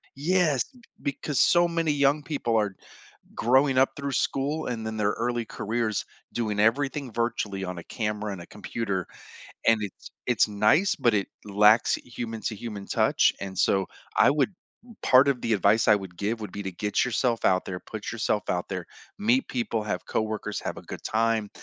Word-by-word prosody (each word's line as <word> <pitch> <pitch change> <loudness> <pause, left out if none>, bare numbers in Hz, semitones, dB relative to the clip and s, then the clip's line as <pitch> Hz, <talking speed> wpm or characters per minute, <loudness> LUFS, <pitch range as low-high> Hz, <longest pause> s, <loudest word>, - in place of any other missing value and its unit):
Yes, 155 -3 +2
b 250 - -18 0.2
because 140 0 -2
so 175 0 +5
many 165 -2 0
young 145 +1 +2
people 130 -7 -1
are 105 -3 0 0.6
growing 130 +2 +3
up 135 - +5
through 140 -1 -3
school 145 +5 -1
and 115 -3 -3
then 110 0 -4
their 105 -1 +1
early 120 0 -1
careers 110 0 -2 0.3
doing 110 -3 -2
everything 135 +3 +1
virtually 105 -4 -2
on 90 -1 -5
a 85 - -8
camera 105 -2 -3
and 95 - -7
a - - -12
computer, 100 -3 -3 0.6
and 115 -1 +5
it's 100 - -8 0.2
it's 120 -3 +3
nice, 105 - +3
but 120 -2 +2
it 100 - 0 0.2
lacks 105 +2 +5
human-to-human 115 -3 -6
touch - - +3
and 95 -1 -6
so 95 0 +3 0.3
I - - +6
would, 150 +6 +2 0.5
part 130 +2 +6
of 135 -3 +1
the 115 - -1
advice 110 +3 +3
I 105 - +8
would 95 -3 -6
give 110 +4 -1
would 105 -4 -6
be 100 - -5
to 95 - -4
get 105 +3 0
yourself 120 -1 0
out 95 0 +3
there, 90 -1 -5
put 110 -2 -6
yourself 110 -2 0
out 90 0 -1
there, 90 -3 -4 0.3
meet 245 +6 +3
people, 115 -3 -1
have 95 -4 -3
coworkers, 110 -2 -2
have - - -4
a - - -7
good - - -8
time, 110 -1 +1
115 Hz, 180 wpm, -26 LUFS, 105-135 Hz, 0.6 s, I